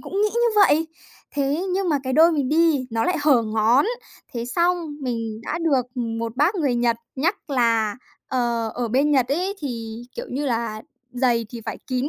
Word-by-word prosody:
cũng 395 - -3
nghĩ 425 - +2
như 475 0 +3
vậy. 325 -6 +5 0.5
Thế, 290 +5 0
nhưng 385 -1 0
mà 295 -3 +2
cái 260 - -2
đôi 325 +4 +6
mình 285 -5 0
đi 310 -3 +3
nó 225 0 0
lại 360 - +1
hở 280 -6 +5
ngón. 220 +4 +3 0.5
Thế 235 -1 -3
xong 340 +6 +1
mình 230 -4 -3
đã - - -3
được, 280 -7 +1
ừm, 230 -2 -3
một 230 +1 -4
bác 300 +9 +3
người 290 -9 0
Nhật 240 -1 +1 0.2
nhắc 330 +4 -1
là, 230 -5 +2 0.3
ờ, 235 -3 0
ở 240 -1 -2
bên 270 +6 +2
Nhật 260 -4 +3
ấy 365 +8 -1
thì, 230 - -5
kiểu - - -5
như 285 +3 -2
là, 230 -3 -2 0.3
giày 245 -2 +1
thì 235 +1 -8
phải - - -4
kín 255 +2 -1
255 Hz, 200 wpm, -23 LUFS, 230-315 Hz, 0.5 s, đôi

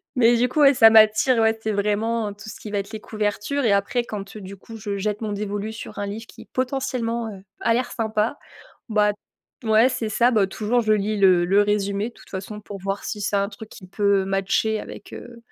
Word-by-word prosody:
Mais 240 -1 +5
du 250 +2 +3
coup, 300 - -2
ouais, 280 -1 +7
ça 225 -1 +8
m'attire. 220 +3 +5
Ouais, 220 0 +3
c'est 220 - -1
vraiment 210 +1 0
tout 205 +2 -13
ce - - -9
qui 210 - -8
va 205 - -2
être 200 +2 -4
les 220 - -6
couvertures, 215 +6 -2
et 210 - +3
après, 200 +5 +1
quand 205 -1 -7
du 200 -1 -9
coup 225 +4 -11
je 205 -2 -4
jette 210 +2 -2
mon 215 -1 -3
dévolu 205 +1 -4
sur 220 - -9
un 205 - -2
livre 220 +3 -6
qui - - -14
potentiellement, 250 -3 -2
heu, 190 - -11 0.2
a 230 - +2
l'air 250 +1 -1
sympa, 220 +2 -1 0.5
bah 210 -1 +3 0.5
t 225 - -7
ouais, 220 +3 +5
c'est 225 -4 -3
ça. 235 +3 +3
Bah, 210 -4 +3
toujours, 220 +5 0
je 215 -1 +2
lis 210 +1 0
le 185 -3 +5
le 195 +3 +4
résumé, 205 +1 -1
de - - -21
toute - - -18
façon, 205 +2 -6
pour 205 -1 -8
voir 195 +1 -3
si 210 - -4
c'est 200 0 -1
un 200 0 0
truc 220 +1 -11
qui 185 - -13
peut 200 0 +2
matcher 195 +3 0
avec, - - -10
heu, 240 -1 -10
215 Hz, 230 wpm, -23 LUFS, 200-230 Hz, 0.5 s, ça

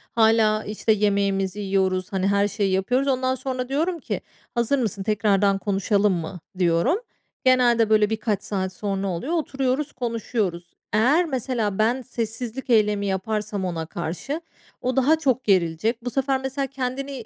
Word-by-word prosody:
Hâlâ, 220 -1 +4
işte, 215 +1 -1
yemeğimizi 200 -2 +1
yiyoruz, 190 -1 0
hani, 190 0 +1
her 200 0 +3
şeyi 200 -1 -1
yapıyoruz. 245 +9 +1
Ondan 260 -1 +1
sonra 255 -1 -4
diyorum 330 +5 0
ki - - -4 0.3
"Hazır 240 +4 +2
mısın? 210 -5 -2
Tekrardan 200 -1 +2
konuşalım 200 0 +1
mı?" 175 +1 -4 0.2
diyorum. 175 - +2 0.5
Genelde 240 -3 +4
böyle 215 -1 +4
birkaç 215 -2 -1
saat 190 -2 -2
sonra 195 -1 -2
oluyor. 190 - -3
Oturuyoruz, 275 -3 -1
konuşuyoruz. 220 -7 -3 0.2
Eğer 265 +12 +4
mesela 245 - -2
ben 235 +4 +2
sessizlik 240 +1 -5
eylemi 210 -3 +3
yaparsam 200 +1 -2
ona 165 -3 -3
karşı 175 - -4 0.4
o 255 +1 -1
daha 270 +4 +4
çok 260 -4 +1
gerilecek. 195 +5 +1
Bu - - 0
sefer 270 +1 0
mesela 265 +1 -2
kendini 265 -1 -4
220 Hz, 145 wpm, -24 LUFS, 195-255 Hz, 0.5 s, Hâlâ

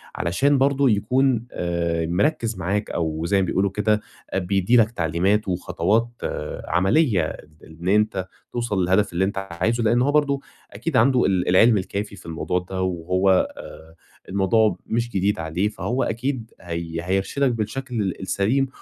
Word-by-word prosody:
علشان 135 +12 +2
برضه 135 0 +3
يكون 120 +3 +1
آآ، 85 -1 -1
مركِّز 115 - 0
معاك، 100 +4 -2
أو 80 -1 -2
زي 100 +3 +2
ما - - +1
بيقولوا 95 +2 0
كده، 105 +1 +1 0.3
آآ، 95 - +2
بيدّي 95 +5 +2
لك 110 -1 +4
تعليمات 95 +3 0
وخطوات 90 +5 0 0.6
عمليّة 95 - +3 0.5
إن 80 +2 -9
أنت 105 -2 +1 0.3
توصل 120 -5 -1
للهدف 95 +2 +2
اللي 90 +2 +2
أنت 100 0 -3
عايزه. 110 +8 0
لأن 120 +2 +3
هو 140 - +2
برضه 145 -2 +2 0.3
أكيد 165 -6 -2
عنده 125 +2 +4
ال 95 -2 +1
العلم 110 +5 +5
الكافي 100 +2 -4
في 90 - -15
الموضوع 85 +2 -2
ده، 95 +1 -5
وهو 90 +1 0 0.3
آآ، 80 +1 -11 0.3
الموضوع 100 0 +2
مش 120 +1 -1
جديد 100 -3 0
عليه، 80 +5 -1
فهو 125 +4 -2
أكيد 115 0 -3
هي 85 -1 -4
هيرشِدك 95 +9 0
بالشكل 120 +2 -3
ال 95 -3 -3
السليم، 110 +8 +1
100 Hz, 155 wpm, -23 LUFS, 90-120 Hz, 0.6 s, العلم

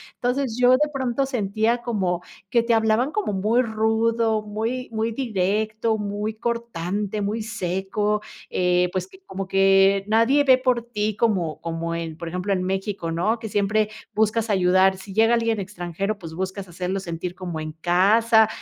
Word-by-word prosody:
Entonces, 245 -1 -1
yo 250 0 +6
de 295 +4 +4
pronto 260 0 0
sentía, 225 -1 0
como 190 -7 -1 0.3
que 235 +1 +3
te 235 - +2
hablaban 225 +5 +2
como 420 - -1
muy 215 +6 +2
rudo, 225 0 +1
muy 225 +5 -3
muy 225 +1 -1
directo, 220 -1 0
muy 210 +1 -3
cortante, 210 -3 -3
muy 210 +3 -2
seco, 210 +1 -1 0.3
eh, 180 0 +2
pues, 185 - -2
que 380 0 -17
como 195 - -5
que 195 0 +4
nadie 230 +7 +4
ve 260 -2 +6
por 255 -2 +1
ti, 215 -3 -2
como 195 -8 0
como 165 0 -3
en, 165 -2 -5
por 170 0 -6
ejemplo, 180 +4 -2
en 185 -1 -1
México, 190 -2 -2
¿no? 210 +8 0
Que 225 -1 -6
siempre, 210 +1 +1 0.2
buscas 220 +1 +1
ayudar. 190 0 +4
Si 190 +1 -10
llega 225 +3 +4
alguien 230 -2 +1
extranjero, 195 +1 -4
pues, 165 -5 -9
buscas 190 +2 -4
hacerlo 180 +2 -3
sentir 175 0 -5
como 175 -4 -5
en 155 0 -5
casa, 210 +7 +4
210 Hz, 165 wpm, -23 LUFS, 185-230 Hz, 0.3 s, yo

